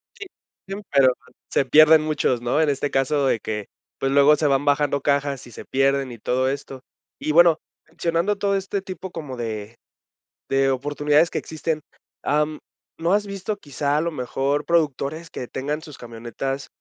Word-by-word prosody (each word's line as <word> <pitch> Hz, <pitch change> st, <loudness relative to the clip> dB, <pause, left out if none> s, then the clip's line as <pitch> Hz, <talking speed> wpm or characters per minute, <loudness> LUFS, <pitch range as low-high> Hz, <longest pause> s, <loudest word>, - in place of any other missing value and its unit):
Sí, 425 Hz, -, -8 dB, 0.4 s
sí, 195 Hz, -, -4 dB, 0.2 s
pero 135 Hz, -2 st, +5 dB
pues -, -, -22 dB
se 140 Hz, -, +2 dB
pierden 155 Hz, +4 st, +7 dB
muchos, 150 Hz, -5 st, 0 dB
¿no? 120 Hz, +6 st, +1 dB
En 155 Hz, -, +3 dB
este 140 Hz, 0 st, -1 dB
caso 135 Hz, +1 st, +1 dB
de 115 Hz, -, +2 dB
que, 105 Hz, -1 st, -4 dB, 0.3 s
pues, 135 Hz, 0 st, 0 dB
luego 140 Hz, +2 st, +6 dB
se 150 Hz, 0 st, +1 dB
van 140 Hz, 0 st, +2 dB
bajando 145 Hz, -1 st, +2 dB
cajas, 140 Hz, -1 st, 0 dB
y -, -, -13 dB
se -, -, -10 dB
pierden 135 Hz, -1 st, +1 dB
y 120 Hz, -, -8 dB
todo 130 Hz, +4 st, 0 dB
esto. 135 Hz, -1 st, -5 dB, 0.4 s
Y, 155 Hz, -, -1 dB
bueno, 170 Hz, 0 st, +6 dB, 0.3 s
mencionando 170 Hz, +5 st, -1 dB
todo 200 Hz, 0 st, +1 dB
este 195 Hz, 0 st, -2 dB
tipo 185 Hz, -1 st, -7 dB
como 145 Hz, -6 st, -7 dB
de 110 Hz, -1 st, -5 dB, 0.7 s
de 135 Hz, 0 st, +2 dB
oportunidades 145 Hz, +4 st, +2 dB
que -, -, -2 dB
existen, 160 Hz, 0 st, -3 dB, 0.4 s
am, 150 Hz, +1 st, 0 dB, 0.4 s
¿no 170 Hz, +3 st, +2 dB
has 205 Hz, 0 st, +1 dB
visto 200 Hz, +1 st, -4 dB
quizá 145 Hz, -4 st, -2 dB
a 155 Hz, -, +1 dB
lo 170 Hz, -, -1 dB
mejor 140 Hz, +1 st, -1 dB
productores 155 Hz, 0 st, 0 dB
que 125 Hz, -, -6 dB
tengan 145 Hz, +3 st, -3 dB
sus 150 Hz, -4 st, -11 dB
camionetas, 120 Hz, +4 st, -5 dB
145 Hz, 180 wpm, -23 LUFS, 135-160 Hz, 0.7 s, pierden